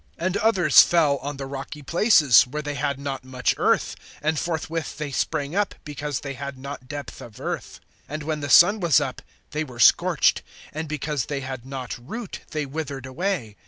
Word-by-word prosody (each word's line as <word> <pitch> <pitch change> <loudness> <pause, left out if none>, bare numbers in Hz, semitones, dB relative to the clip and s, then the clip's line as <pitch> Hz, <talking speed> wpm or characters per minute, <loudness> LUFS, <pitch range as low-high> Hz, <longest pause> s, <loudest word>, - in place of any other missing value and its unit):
(5)And 185 +2 -1
others 185 -9 +6
fell 155 -5 +3
on 140 +2 -6
the 135 - -5
rocky 140 +2 -7
places, 155 - +5
where 150 +4 -5
they 145 0 -3
had 140 -1 -2
not 140 -2 -4
much 130 -1 0
earth; - - +2 0.2
and 155 0 0
forthwith 165 -1 -3
they 150 -2 -4
sprang 145 +3 -2
up, 205 -1 0
because 145 -2 -4
they 140 -1 -5
had 140 0 -6
not 130 -1 -8
depth 145 -2 -7
of 115 +1 -12
earth. 150 - -5 0.3
(6)And 155 +1 -5
when 155 0 -2
the 145 -1 -4
sun 200 +9 +7
was 170 -5 +4
up, 135 -3 -4 0.3
they 150 +1 -1
were 125 -5 -11
scorched; - - +4 0.3
and 160 +1 -4
because 150 -2 -2
they 140 -2 -3
had 130 -1 -7
not 130 -2 -6
root, 215 - -7
they 155 -2 -2
withered 140 -2 -5
away. 130 - -3
145 Hz, 190 wpm, -24 LUFS, 135-160 Hz, 0.3 s, sun